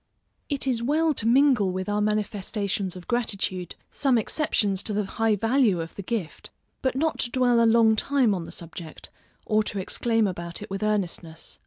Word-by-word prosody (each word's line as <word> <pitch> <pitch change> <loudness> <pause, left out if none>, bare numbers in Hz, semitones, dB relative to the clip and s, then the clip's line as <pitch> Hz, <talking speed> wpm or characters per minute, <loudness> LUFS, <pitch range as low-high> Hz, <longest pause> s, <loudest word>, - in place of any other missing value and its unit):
It 280 -3 0
is 250 -4 0
well 310 +5 +2
to 225 - -1
mingle 245 -6 +4
with 185 0 -4
our 205 0 0
manifestations 205 -2 -1
of 180 -1 -10
gratitude, 200 -6 -2 0.2
some 270 -4 +2
exceptions 210 -6 0
to 215 - 0
the 210 +1 0
high 225 +2 +1
value 225 -2 +2
of 165 0 -5
the - - -7
gift, 200 -4 -4 0.3
but 260 -1 0
not 315 +3 0
to 240 - 0
dwell 245 -2 +3
a - - +5
long 225 -1 +5
time 255 -1 +2
on 175 -3 -3
the - - -9
subject, 165 -1 -8 0.3
or 215 -1 +2
to 210 -1 -4
exclaim 225 +3 +1
about 170 -3 -4
it 210 - -11
with 195 +1 -3
earnestness. 180 -6 -3
215 Hz, 185 wpm, -25 LUFS, 190-240 Hz, 0.3 s, a